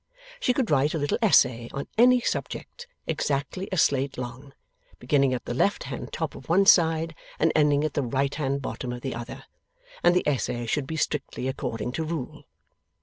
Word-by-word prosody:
She 255 Hz, -, +2 dB
could 250 Hz, -, 0 dB
write 145 Hz, +2 st, +2 dB
a -, -, +1 dB
little 145 Hz, +6 st, -1 dB
essay 125 Hz, -, +4 dB
on 140 Hz, -, -4 dB
any 250 Hz, +2 st, +6 dB
subject, 485 Hz, -, -4 dB, 0.2 s
exactly 145 Hz, +7 st, -2 dB
a 185 Hz, -, -1 dB
slate 140 Hz, -3 st, +2 dB
long, 125 Hz, +3 st, -7 dB, 0.5 s
beginning 140 Hz, -2 st, +2 dB
at 125 Hz, -, -3 dB
the -, -, -3 dB
left 200 Hz, +11 st, +1 dB
hand -, -, -6 dB
top -, -, -3 dB
of -, -, -12 dB
one 190 Hz, +4 st, +4 dB
side 165 Hz, -3 st, +4 dB, 0.2 s
and 160 Hz, -, +3 dB
ending 150 Hz, -1 st, +3 dB
at 155 Hz, -, -1 dB
the 145 Hz, -, 0 dB
right 135 Hz, +2 st, 0 dB
hand 140 Hz, -2 st, -2 dB
bottom 120 Hz, +1 st, -4 dB
of 120 Hz, -, -7 dB
the 135 Hz, -, -3 dB
other, 120 Hz, +1 st, -7 dB, 0.6 s
and 175 Hz, -, +4 dB
the 180 Hz, -, +1 dB
essay 125 Hz, -4 st, -1 dB
should 135 Hz, +4 st, -1 dB
be 160 Hz, -, -4 dB
strictly 145 Hz, -4 st, -2 dB
according 125 Hz, -4 st, -3 dB
to 160 Hz, -, -2 dB
rule. 155 Hz, -5 st, -5 dB
140 Hz, 190 wpm, -26 LUFS, 130-165 Hz, 0.6 s, any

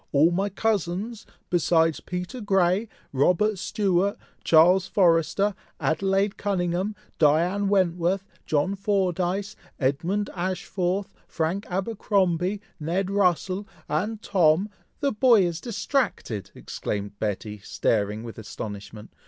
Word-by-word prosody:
all 150 Hz, +4 st, +5 dB
my 195 Hz, +4 st, 0 dB
cousins, 210 Hz, +2 st, -2 dB, 0.2 s
besides 165 Hz, -2 st, +3 dB
Peter 180 Hz, +8 st, -5 dB
Grey, 195 Hz, +1 st, +2 dB, 0.2 s
Robert 180 Hz, +9 st, +2 dB
Stewart, 200 Hz, -1 st, +1 dB, 0.3 s
Charles 175 Hz, +4 st, +5 dB
Forrester, 175 Hz, +2 st, +3 dB, 0.3 s
Adelaide 195 Hz, +4 st, +1 dB
Cunninghame, 190 Hz, +1 st, -1 dB, 0.2 s
Diana 170 Hz, +7 st, +3 dB
Wentworth, 185 Hz, -1 st, +1 dB, 0.2 s
John 155 Hz, +6 st, +1 dB
Fordyce, 195 Hz, 0 st, 0 dB, 0.2 s
Edmund 170 Hz, +10 st, 0 dB
Ashford, 185 Hz, +1 st, -1 dB, 0.2 s
Frank 170 Hz, +5 st, -2 dB
Abercromby, 190 Hz, -1 st, 0 dB, 0.2 s
Ned 180 Hz, +5 st, -1 dB
Russel, 195 Hz, 0 st, +1 dB, 0.2 s
and 210 Hz, +8 st, -1 dB
Tom 180 Hz, +1 st, +3 dB, 0.2 s
" -, -, -42 dB
"The 280 Hz, -1 st, +2 dB
boy 225 Hz, -2 st, +5 dB
is 170 Hz, -1 st, -3 dB
distracted!" 215 Hz, -, -2 dB
exclaimed 100 Hz, 0 st, -5 dB
Betty, 105 Hz, 0 st, -3 dB
staring 105 Hz, +1 st, -1 dB
with 115 Hz, -1 st, -8 dB
astonishment. 105 Hz, 0 st, -8 dB
185 Hz, 105 wpm, -25 LUFS, 165-200 Hz, 0.3 s, all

